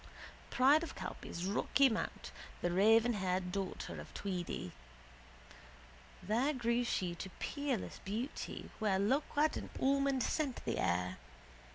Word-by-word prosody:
Pride 280 Hz, +5 st, +5 dB
of 335 Hz, -, -5 dB
Calpe's 170 Hz, -, -6 dB
rocky 245 Hz, +7 st, +3 dB
mount, 225 Hz, -3 st, -3 dB, 0.3 s
the 175 Hz, -, +2 dB
ravenhaired 190 Hz, -2 st, +3 dB
daughter 195 Hz, -1 st, -4 dB
of -, -, -12 dB
Tweedy. 175 Hz, -, -3 dB, 1.5 s
There 245 Hz, +9 st, +2 dB
grew 240 Hz, -2 st, +1 dB
she 185 Hz, -7 st, -1 dB
to 180 Hz, +2 st, -6 dB
peerless 285 Hz, -7 st, -2 dB
beauty 225 Hz, +8 st, -4 dB
where 210 Hz, -3 st, +2 dB
loquat 290 Hz, +8 st, +2 dB
and -, -, -6 dB
almond 275 Hz, -1 st, +2 dB
scent 285 Hz, -6 st, -1 dB
the -, -, -1 dB
air. 90 Hz, +1 st, 0 dB
225 Hz, 115 wpm, -35 LUFS, 185-270 Hz, 1.5 s, Pride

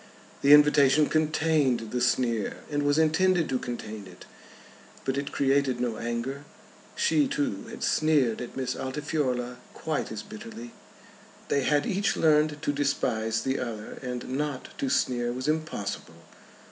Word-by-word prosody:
The 140 Hz, -, +4 dB
invitation 150 Hz, 0 st, +5 dB
contained 155 Hz, -7 st, +1 dB
the 125 Hz, -, -1 dB
sneer, 120 Hz, -3 st, +1 dB
and 145 Hz, 0 st, 0 dB
was 145 Hz, +1 st, +2 dB
intended 165 Hz, +2 st, +3 dB
to 130 Hz, -, 0 dB
contain 110 Hz, -5 st, -6 dB
it. 90 Hz, -1 st, -13 dB, 0.8 s
But 135 Hz, -, 0 dB
it 140 Hz, 0 st, -3 dB
created 135 Hz, -2 st, +1 dB
no 120 Hz, -3 st, -1 dB
anger. 120 Hz, +4 st, -3 dB, 0.5 s
She, 465 Hz, -12 st, +2 dB
too, 280 Hz, 0 st, -2 dB
had -, -, -7 dB
sneered 145 Hz, -8 st, +2 dB
at 125 Hz, -, -7 dB
Miss 130 Hz, -1 st, -2 dB
Altifiorla 130 Hz, -3 st, -2 dB, 0.2 s
quite 155 Hz, -7 st, -3 dB
as 110 Hz, -1 st, -5 dB
bitterly. 115 Hz, +2 st, -9 dB, 0.8 s
They 140 Hz, -, +2 dB
had 145 Hz, +2 st, +2 dB
each 195 Hz, +1 st, 0 dB
learned 150 Hz, -1 st, +3 dB
to 145 Hz, -, 0 dB
despise 115 Hz, -6 st, 0 dB
the 135 Hz, 0 st, -1 dB
other, 110 Hz, -4 st, -6 dB
and 125 Hz, -2 st, -5 dB
not 140 Hz, 0 st, -3 dB
to 135 Hz, -, -1 dB
sneer 120 Hz, -3 st, +1 dB
was 130 Hz, +3 st, -4 dB
impossible. 155 Hz, -9 st, -3 dB
135 Hz, 145 wpm, -27 LUFS, 120-150 Hz, 0.8 s, invitation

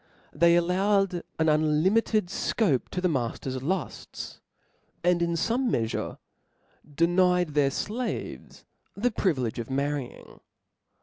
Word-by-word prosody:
They 170 Hz, +3 st, +5 dB
allowed 185 Hz, +1 st, +2 dB, 0.2 s
an 160 Hz, -, +1 dB
unlimited 155 Hz, +8 st, +2 dB
fcbpe 170 Hz, -, 0 dB
to 180 Hz, -, -3 dB
the 180 Hz, -, +2 dB
ma 130 Hz, -8 st, 0 dB
tter's 130 Hz, -1 st, -5 dB
lufts, 175 Hz, +3 st, -4 dB, 0.6 s
and,' 175 Hz, 0 st, +3 dB
in 170 Hz, 0 st, +1 dB
fome 235 Hz, +9 st, 0 dB
meafure, 115 Hz, -, -2 dB, 0.8 s
denied 180 Hz, +1 st, +3 dB
their 145 Hz, -2 st, +2 dB
flaves 230 Hz, -, -4 dB, 0.3 s
the 240 Hz, +5 st, 0 dB
privilege 130 Hz, -, -1 dB
of 115 Hz, -, -5 dB
marrying. 140 Hz, -1 st, -3 dB
170 Hz, 115 wpm, -27 LUFS, 145-190 Hz, 0.8 s, They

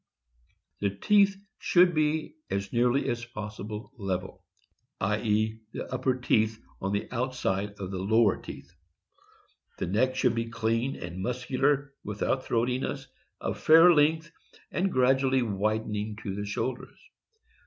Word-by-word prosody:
The 100 Hz, -, +1 dB
teeth 200 Hz, -, +4 dB, 0.2 s
should 175 Hz, 0 st, +4 dB
be 155 Hz, -, 0 dB, 0.2 s
as 100 Hz, 0 st, -3 dB
nearly 125 Hz, +3 st, +2 dB
as 120 Hz, 0 st, -2 dB
possible 105 Hz, 0 st, -7 dB
level; 95 Hz, -1 st, -4 dB, 0.6 s
i. 105 Hz, +2 st, 0 dB
e.y 110 Hz, 0 st, 0 dB
the -, -, -6 dB
upper 130 Hz, 0 st, +1 dB
teeth 110 Hz, -3 st, +1 dB, 0.2 s
on 95 Hz, -, -1 dB
the 100 Hz, 0 st, -1 dB
outside 115 Hz, -5 st, -1 dB
of 95 Hz, -2 st, -7 dB
the 95 Hz, -, -3 dB
lower 110 Hz, +2 st, +3 dB
teeth. 85 Hz, -, -10 dB, 1.1 s
Neck 125 Hz, +8 st, +1 dB
should 125 Hz, -2 st, +2 dB
be 115 Hz, 0 st, -2 dB
clean 115 Hz, +3 st, -1 dB
and 85 Hz, +2 st, -6 dB
muscular, 135 Hz, +4 st, 0 dB
without 105 Hz, +5 st, -2 dB
throati 125 Hz, +2 st, +1 dB
ness, 135 Hz, -1 st, -4 dB, 0.3 s
of -, -, -3 dB
fair 165 Hz, +3 st, +7 dB
length, 160 Hz, +2 st, +2 dB, 0.4 s
and 190 Hz, +1 st, 0 dB
gradually 130 Hz, 0 st, +3 dB
widening 105 Hz, 0 st, -1 dB
to 100 Hz, -, -3 dB
the 105 Hz, +1 st, -4 dB
shoul 115 Hz, +5 st, -1 dB
ders. -, -, -14 dB
115 Hz, 135 wpm, -28 LUFS, 105-135 Hz, 1.1 s, fair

